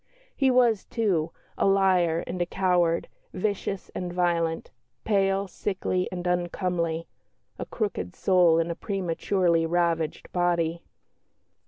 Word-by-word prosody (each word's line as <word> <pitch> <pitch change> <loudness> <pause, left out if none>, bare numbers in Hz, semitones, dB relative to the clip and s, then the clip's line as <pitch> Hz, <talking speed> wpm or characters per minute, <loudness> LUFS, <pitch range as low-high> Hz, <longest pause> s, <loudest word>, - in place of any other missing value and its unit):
He 270 -2 +3
was, 245 -5 +3
too, 185 -9 0 0.3
"a - - +3
liar 185 -4 +3
and 180 +1 -4
a - - +2
coward, 175 -3 +1 0.3
vicious 200 0 -3
and 180 -1 -4
violent; 170 -2 0 0.3
pale, 195 -1 +1
sickly, 185 -1 -2
and 180 -1 -5
uncomely 175 -2 -1 0.5
a - - -5
crooked 200 - -3
soul 180 -4 +4
in 165 +1 0
a - - -4
prematurely 180 -2 0
ravaged 165 -2 -1
body." 170 -2 0
180 Hz, 120 wpm, -26 LUFS, 170-195 Hz, 0.5 s, soul